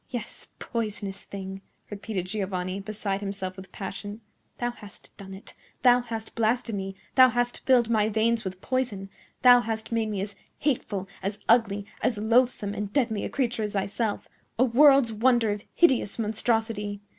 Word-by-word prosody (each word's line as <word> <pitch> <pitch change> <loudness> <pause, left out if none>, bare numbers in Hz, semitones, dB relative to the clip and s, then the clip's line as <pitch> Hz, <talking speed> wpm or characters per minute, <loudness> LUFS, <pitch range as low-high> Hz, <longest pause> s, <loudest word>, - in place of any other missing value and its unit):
"Yes, 240 -3 -6
poisonous 210 -4 -4
thing!" 195 -1 -7 0.3
repeated 205 -2 -4
Giovanni, 185 -1 -3
beside 200 -1 -3
himself 195 -2 -4
with 190 -1 -11
passion. 205 +2 -7 0.4
"Thou 240 0 -1
hast 210 -4 -15
done 195 -1 -9
it! 195 - -13 0.3
Thou 245 -1 +7
hast 225 -2 -6
blasted 230 +1 0
me! 195 -1 -4 0.2
Thou 255 -1 +8
hast 245 0 -1
filled 250 -3 +5
my 215 -2 +2
veins 225 +1 +1
with 185 -1 -6
poison! 225 -7 -2 0.3
Thou 245 -1 +9
hast 225 -1 -4
made 225 -1 0
me 205 -2 -2
as 200 +1 -5 0.2
hateful, 215 -9 -1
as 200 +2 -3
ugly, 210 -4 +3 0.2
as 230 - +1
loathsome 220 -1 +2
and 205 -1 -4
deadly 225 -4 0
a - - -3
creature 240 -4 -1
as 210 -1 -2
thyself—a 210 +4 -2
world's 270 -1 +5
wonder 235 0 +3
of 205 0 -5
hideous 265 - +3
monstrosity! 220 -2 -1
215 Hz, 155 wpm, -26 LUFS, 200-240 Hz, 0.4 s, Thou